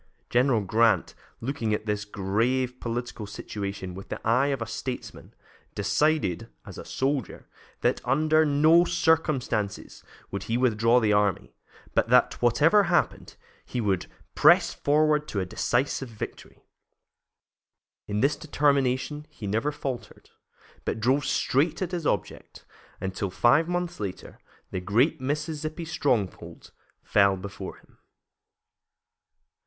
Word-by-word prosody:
General 125 -2 +3
Grant, 105 -1 +2 0.3
looking 115 -4 -1
at 105 - -6
this 105 -1 -2
grave 115 +6 -1
political 120 -2 -4
situation 100 -2 -6
with 95 +2 -10
the - - -4
eye 125 +5 +3
of 140 -2 -1
a 115 - -3
statesman, 125 +2 -7 0.4
decided, 105 - 0 0.2
as - - -9
a - - -7
soldier, 135 -5 -2 0.3
that - - +1
under 155 +4 +3
no 155 +3 +5
circumstances 155 - 0 0.3
would 100 -1 -4
he 115 - +1
withdraw 115 -1 +3
the 110 -3 +2
army, 105 -3 +1 0.4
but - - +1
that, - - +3
whatever 160 - +4
happened, 175 0 0 0.3
he 125 - -5
would 100 -5 0 0.3
"press - - +5
forward 150 +1 +2
to 100 - -3
a 95 - -1
decisive 125 +7 -1
victory." 110 -2 -9 1.4
In 105 0 -1
this 140 +3 +3
determination 145 0 0
he 105 - -9
never 110 +9 0
faltered, 135 -4 -7 0.5
but - - -2
drove 130 +5 +2
straight 145 +5 +1
at 185 -2 -3
his 170 -4 -2
object 100 - -4 0.3
until, 95 +1 -3
five 120 - +3
months 175 -1 -2
later, 100 -3 -6 0.3
the 95 - -3
great 125 - +2
Mississippi 155 +3 -3
stronghold 130 - -2 0.3
fell 100 -1 +3
before 95 +1 -7
him. - - -25
125 Hz, 125 wpm, -26 LUFS, 105-150 Hz, 1.4 s, no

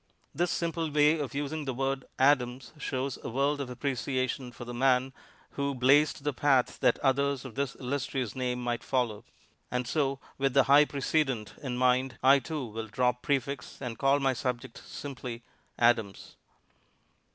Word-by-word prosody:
This 175 +4 0
simple 165 -1 -1
way 150 +2 +4
of 140 -1 -4
using 145 +2 -3
the 130 -2 -3
word 135 +1 -1
"Adams" 130 -2 +2
shows 135 -2 -3
a - - -4
world 140 +4 0
of 135 - -5
appreciation 130 0 -2
for 120 - -9
the 120 - -6
man 130 +1 +2 0.4
who 140 -1 -2
blazed 140 +3 +4
the 145 -1 0
path 130 -1 +2
that 125 -2 +3
others 140 0 +1
of 130 - -8
this 140 0 -2
illustrious 130 -3 -3
name 125 -1 -1
might 120 -1 -2
follow. 120 -5 -1 0.5
And 125 -1 -2
so 140 -2 0 0.2
with 135 -1 +1
the 135 - +7
high 140 +3 +6
precedent 135 -6 -1
in 130 -4 -3
mind, 125 0 +2
I, 135 +1 +7
too, 150 -1 -4
will 110 0 -6
drop 125 +2 0
prefix 140 -1 -2
and 120 -4 -5
call 135 +1 +3
my 135 -1 +2
subject 125 -1 -4
simply 125 -4 -7 0.3
"Adams." 115 -5 +1
130 Hz, 165 wpm, -29 LUFS, 125-140 Hz, 0.5 s, the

